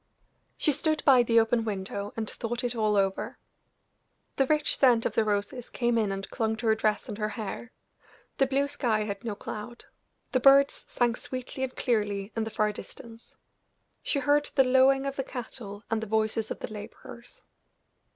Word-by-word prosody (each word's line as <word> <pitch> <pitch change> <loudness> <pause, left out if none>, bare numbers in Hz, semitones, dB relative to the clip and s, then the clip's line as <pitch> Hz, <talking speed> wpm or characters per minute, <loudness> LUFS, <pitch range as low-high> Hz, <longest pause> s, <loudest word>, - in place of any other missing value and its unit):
She 305 - +2
stood 310 +2 0
by 265 -3 +7
the 230 -1 +4
open 225 +1 +2
window 200 -1 -4
and 220 -1 -2
thought 240 +3 -4
it 245 0 0
all 215 -2 +1
over. 195 -1 0 1.0
The 270 - +3
rich 300 +1 +2
scent 245 -4 +4
of - - 0
the 225 - +3
roses 210 +4 -2
came 240 -1 0
in 215 -3 +1
and 195 0 -4
clung 220 -1 0
to 220 +2 -7
her 220 - +5
dress 215 -1 0
and 215 -2 -6
her 210 0 0
hair; 225 +2 -6 0.7
the 270 - +4
blue 275 +1 +1
sky 245 -7 0
had 200 -2 -5
no 225 -3 -3
cloud; 215 +3 -8 0.5
the 255 - +2
birds 275 +2 +5
sang 240 -1 +1
sweetly 255 +2 -6
and 260 -1 -3
clearly 205 -4 -1
in 225 -1 -1
the - - -4
far 215 -1 +1
distance; 230 +2 -10 0.7
she - - -1
heard 290 +2 +2
the 270 - +6
lowing 265 +1 +4
of 275 0 -3
the 270 - 0
cattle 225 -5 -7
and 225 -1 +1
the 220 - -5
voices 220 +1 0
of - - -6
the - - -5
laborers. 215 +3 -10
230 Hz, 185 wpm, -28 LUFS, 215-260 Hz, 1.0 s, by